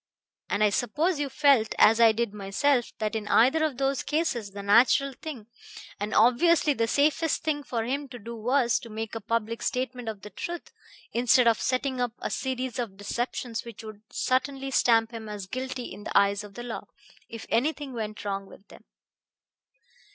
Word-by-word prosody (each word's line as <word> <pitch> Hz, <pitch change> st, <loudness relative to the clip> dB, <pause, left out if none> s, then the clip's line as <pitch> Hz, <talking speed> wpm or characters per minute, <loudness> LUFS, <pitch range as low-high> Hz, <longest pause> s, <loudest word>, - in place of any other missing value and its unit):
"And 210 Hz, -, +1 dB
I 210 Hz, -, +4 dB
suppose 295 Hz, -, 0 dB
you 285 Hz, -1 st, -1 dB
felt, 275 Hz, -7 st, +3 dB
as 225 Hz, +2 st, +6 dB
I 225 Hz, -1 st, +8 dB
did 225 Hz, -1 st, -2 dB
myself, 225 Hz, +6 st, 0 dB
that 215 Hz, 0 st, -2 dB
in 215 Hz, -2 st, -3 dB
either 260 Hz, +10 st, +4 dB
of 300 Hz, -5 st, -1 dB
those 275 Hz, 0 st, 0 dB
cases 295 Hz, -9 st, -1 dB
the 200 Hz, 0 st, -8 dB
natural 250 Hz, +6 st, +4 dB
thing, 260 Hz, -5 st, -8 dB, 0.5 s
and 205 Hz, +1 st, -3 dB
obviously 295 Hz, +7 st, +4 dB
the 230 Hz, -3 st, 0 dB
safest 300 Hz, +5 st, +1 dB
thing, 300 Hz, -2 st, 0 dB
for 235 Hz, -5 st, -3 dB
him 275 Hz, +4 st, -2 dB
to 250 Hz, -, -8 dB
do 235 Hz, +1 st, -8 dB
was 240 Hz, +1 st, +2 dB
to 230 Hz, -, -11 dB
make 220 Hz, 0 st, -5 dB
a 225 Hz, -, -4 dB
public 230 Hz, +1 st, -2 dB
statement 250 Hz, -2 st, -2 dB
of 205 Hz, -3 st, -7 dB
the 210 Hz, -, -9 dB
truth, 345 Hz, -1 st, -6 dB, 0.4 s
instead 245 Hz, +1 st, +4 dB
of 230 Hz, -2 st, +3 dB
setting 255 Hz, 0 st, -1 dB
up 245 Hz, -2 st, -1 dB
a -, -, -4 dB
series 260 Hz, -2 st, -3 dB
of 215 Hz, -6 st, -4 dB
deceptions 235 Hz, +2 st, -3 dB
which 230 Hz, -2 st, -10 dB
would 215 Hz, -1 st, -10 dB
certainly 270 Hz, +1 st, -1 dB
stamp 225 Hz, -3 st, +3 dB
him 225 Hz, -2 st, -7 dB
as 205 Hz, -2 st, -6 dB
guilty 255 Hz, +3 st, -5 dB
in 205 Hz, -, -11 dB
the -, -, +1 dB
eyes 200 Hz, 0 st, +3 dB
of 205 Hz, -1 st, -12 dB
the 240 Hz, -, -6 dB
law, 240 Hz, -2 st, -6 dB, 0.4 s
if 230 Hz, -1 st, -8 dB
anything 275 Hz, +3 st, 0 dB
went 215 Hz, -2 st, -5 dB
wrong 195 Hz, -1 st, -3 dB
with 200 Hz, -, -16 dB
them." -, -, -15 dB
235 Hz, 190 wpm, -27 LUFS, 220-270 Hz, 0.5 s, I